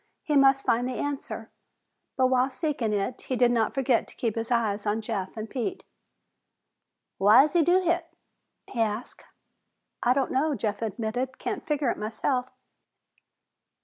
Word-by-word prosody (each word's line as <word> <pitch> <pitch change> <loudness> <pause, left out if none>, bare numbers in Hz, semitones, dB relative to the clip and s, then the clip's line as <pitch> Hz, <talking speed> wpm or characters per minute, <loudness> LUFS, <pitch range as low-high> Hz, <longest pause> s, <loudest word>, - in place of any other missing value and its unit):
He 300 - 0
must 270 -1 +5
find 240 +2 +2
the 255 - -4
answer, 285 -1 -4 0.7
but 260 - +4
while 255 0 +3
seeking 270 -5 -2
it 205 +4 -2
he 260 - -3
did 245 -1 +4
not 230 -2 +1
forget 260 -3 +2
to - - -12
keep 230 -3 -1
his 225 +1 -4
eyes 220 -4 0
on 210 +2 +1
Jeff 215 -3 -4
and 215 0 -4
Pete. 270 - -4 1.4
"Why's 230 +9 +6
he 345 - +4
do 360 +4 +3
hit?" 340 -1 -1 0.5
he 235 - -3
asked. 220 +2 -3 0.8
"I 245 - +4
don't 275 -1 0
know," 285 +3 +1
Jeff 210 -2 -3
admitted. 230 +4 -3
"Can't 395 -4 -4
figure 290 -5 +1
it - - -6
myself." 250 +4 -1
250 Hz, 155 wpm, -27 LUFS, 220-275 Hz, 1.4 s, Why's